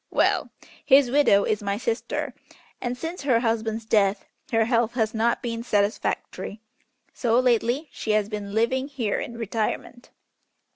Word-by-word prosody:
Well! - - +2 0.3
his 270 -3 +5
widow 270 -8 +5
is 215 - 0
my 200 0 -1
sister, 230 +1 -2 0.5
and 245 0 -2
since 330 +6 -5
her 255 -5 +2
husband's 225 -1 -1
death 205 -2 +2 0.3
her 225 -1 +3
health 235 0 +1
has 220 -3 0
not 230 +1 +1
been 230 -1 -3
satisfactory, 205 -1 -1 0.5
so 235 -1 +2
lately 250 +4 +1
she - - -7
has 210 -1 +2
been 205 -1 -5
living 260 +4 +1
here 245 -8 -2
in 235 - -6
retirement." 230 +2 -3
230 Hz, 145 wpm, -25 LUFS, 215-245 Hz, 0.5 s, his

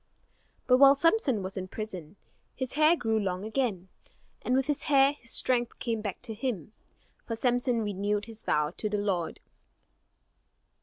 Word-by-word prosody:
But 250 - +5
while 275 0 +8
Samson 280 - +2
was 190 +2 -6
in 185 0 -4
prison, 185 -5 -7 0.4
his 260 -1 -3
hair 310 +3 +5
grew 225 -8 0
long 190 -1 -2
again; 220 -6 -2 0.5
and 250 - 0
with 265 0 +2
his 295 0 -1
hair 275 0 +5
his 235 -5 -17
strength 240 -1 +1
came 230 -3 -2
back 205 0 -5
to 230 -3 -5
him; 215 - -4 0.5
for 230 - -2
Samson 245 0 +1
renewed 205 0 -1
his 225 -1 -9
vow 150 0 0
to 215 - -2
the 210 - -1
Lord. 195 -5 -2
225 Hz, 160 wpm, -28 LUFS, 200-260 Hz, 0.5 s, while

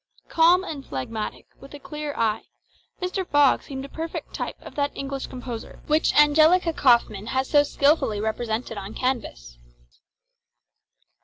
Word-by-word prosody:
Calm 345 +3 +5
and 295 -7 -6
phlegmatic, 210 - -5
with 275 +1 -12
a - - -10
clear 300 0 -6
eye, 220 -1 0 0.5
Mr. 370 +1 -2
Fogg 290 -5 +3
seemed 270 -1 -7
a - - -8
perfect 325 +3 -6
type - - -4
of - - -11
that 285 -1 0
English 275 -1 -4
composure 245 -3 -8
which 305 +1 +2
Angelica 315 +4 +5
Kauffmann 235 -7 +2
has 260 +2 -1
so 290 - +5
skilfully 285 -6 +1
represented 220 0 -3
on 200 +2 -8
canvas. - - -3
275 Hz, 140 wpm, -24 LUFS, 225-300 Hz, 0.5 s, Calm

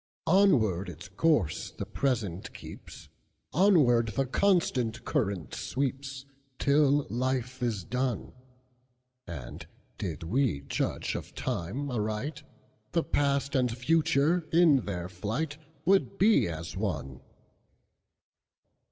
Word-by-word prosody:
Onward 125 - +3
its 90 +3 -10
course 105 - +1
the - - -6
present 110 -10 -2
keeps, - - -11 0.5
Onward 145 - +5
the 135 - +1
constant 130 - +1
current 95 - -1
sweeps, 135 0 -3 0.3
Till 145 0 +3
life 130 +1 -1
is 115 -6 -1
done; 125 +2 -2 0.9
And, 65 -8 -8 0.3
did 85 -4 -4
we 105 - +1
judge 70 - -2
of - - -7
time 130 +12 -3
aright, 115 +6 -2 0.5
The 165 - +2
past 140 -1 0
and 130 -3 +2
future 160 +3 +2
in 165 -4 +6
their 90 0 -3
flightWould 155 - -1
be 210 - +4
as 80 -2 -6
one. 65 -1 -3
130 Hz, 100 wpm, -29 LUFS, 100-150 Hz, 0.9 s, in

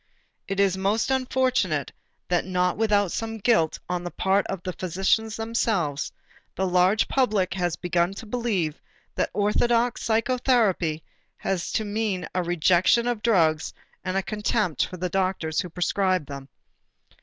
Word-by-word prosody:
It 195 0 -3
is 195 -2 +3
most 210 +6 +1
unfortunate 255 - +1 0.4
that 175 -1 +1
not 180 -1 0
without 205 -4 +2
some 225 0 -3
guilt 215 -8 +2
on 180 0 -2
the 175 - -4
part 190 +2 +1
of 195 -3 -5
the 185 - -4
physicians 195 +6 0
themselves, 220 - -1 0.4
the 190 - 0
large 185 +3 +3
public 210 -9 +1
has 175 -3 -1
begun 175 +1 0
to 225 - -8
believe 210 -9 -2 0.3
that - - -1
orthodox 230 +4 +1
psychotherapy 225 - +1 0.3
has 185 -3 -2
to 220 - 0
mean 205 -4 -2
a 185 - +1
rejection 175 +6 +3
of 240 -3 -1
drugs 165 -9 +2 0.3
and 185 +1 -1
a 195 - 0
contempt 210 - 0
for 185 - -8
the 180 +1 -2
doctors 185 -4 -1
who 180 - -7
prescribe 185 0 0
them. 140 -1 -9
190 Hz, 145 wpm, -25 LUFS, 175-220 Hz, 0.4 s, is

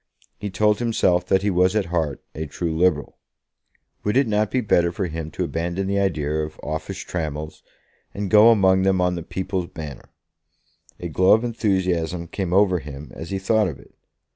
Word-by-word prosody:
He 105 - -4
told 105 +2 +2
himself 95 -7 +1
that 95 0 +2
he 105 - +1
was 90 +2 +3
at 105 -3 +1
heart 80 -5 -1
a 80 0 -5
true 80 +2 -3
Liberal. 80 -3 +1 0.8
Would 105 +4 +1
it 135 - +4
not 105 -1 +1
be 130 - 0
better 85 -7 +2
for 95 +2 -2
him 80 -2 -5
to - - -3
abandon 85 +3 -2
the 100 +1 0
idea 80 -6 0
of 75 0 -8
office 80 +5 -4
trammels, 80 -4 -5 0.5
and 100 -2 -4
go 110 +2 +8
among 95 -4 +4
them 95 -1 +2
on 90 0 +2
the 85 - -4
People's 95 +1 -3
Banner? 75 -6 -9 0.9
A - - -4
glow 95 +1 +4
of 110 - +3
enthusiasm 90 -7 0
came 90 +1 -4
over 95 -1 +4
him 75 -1 -9
as 80 - -7
he 95 - -2
thought 105 +2 +2
of 75 -6 -5
it. - - -18
90 Hz, 190 wpm, -23 LUFS, 80-100 Hz, 0.9 s, go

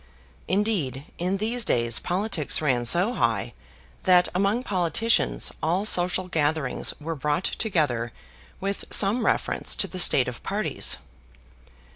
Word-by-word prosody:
Indeed, 185 - -1
in 180 +3 -1
these 225 +4 0
days 120 - +1
politics 180 -4 -1
ran 125 -6 0
so 180 - +4
high - - -1 0.5
that 180 -1 +4
among 200 +6 +1
politicians 195 +3 +1
all 180 +6 0
social 180 -2 +2
gatherings 155 -5 -1
were 160 +2 -4
brought 150 +3 -2
together 145 - -1 0.5
with 195 +1 -4
some 215 +4 +2
reference - - 0
to - - 0
the 185 - -5
state 135 -7 +5
of 125 -2 -6
parties. 205 +2 0
180 Hz, 125 wpm, -25 LUFS, 150-200 Hz, 0.5 s, state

